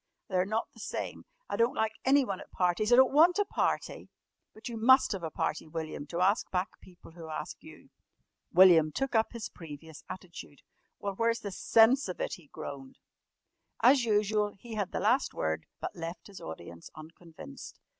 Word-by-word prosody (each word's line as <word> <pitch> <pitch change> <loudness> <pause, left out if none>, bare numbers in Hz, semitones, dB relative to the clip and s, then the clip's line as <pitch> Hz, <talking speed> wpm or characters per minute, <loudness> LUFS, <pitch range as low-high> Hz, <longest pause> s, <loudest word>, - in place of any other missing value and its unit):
They're 185 -1 +1
not 220 +2 -1
the - - -17
same. - - -5 0.2
I - - -3
don't 235 +5 +2
like 220 0 +1
anyone 260 -8 +3
at - - -12
parties. 180 +5 0
I - - +8
don't 260 +1 +5
want 335 +5 +6
a 410 - +2
party!" - - -2 0.4
"But 215 - -10
you 235 - -5
must 260 +4 +5
have 195 -4 -3
a 165 - -3
party, 155 +1 -3
William, 155 -2 -6
to 170 +3 -3
ask 195 +4 +2
back 185 +2 -1
people 180 -2 -16
who 165 -1 -10
ask 155 - -6
you." - - -15 0.6
William 170 -4 +7
took 270 - -2
up 220 -1 +2
his 235 -2 -5
previous 160 -1 -11
attitude. 180 -6 -10 0.3
"Well, 200 -1 -4
where's 230 +2 0
the 200 - -5
sense 230 +7 +4
of 180 - -6
it?" - - -2
he 170 -5 -10
groaned. 135 -1 -9 0.9
As 260 0 +6
usual 210 -1 +1
he 230 +3 -10
had 205 -3 -2
the - - -2
last 240 +7 +2
word, 80 0 -2
but - - -5
left 170 +1 -7
his 200 -2 -12
audience 85 +1 -9
unconvinced. 160 - -12
195 Hz, 185 wpm, -30 LUFS, 165-230 Hz, 0.9 s, I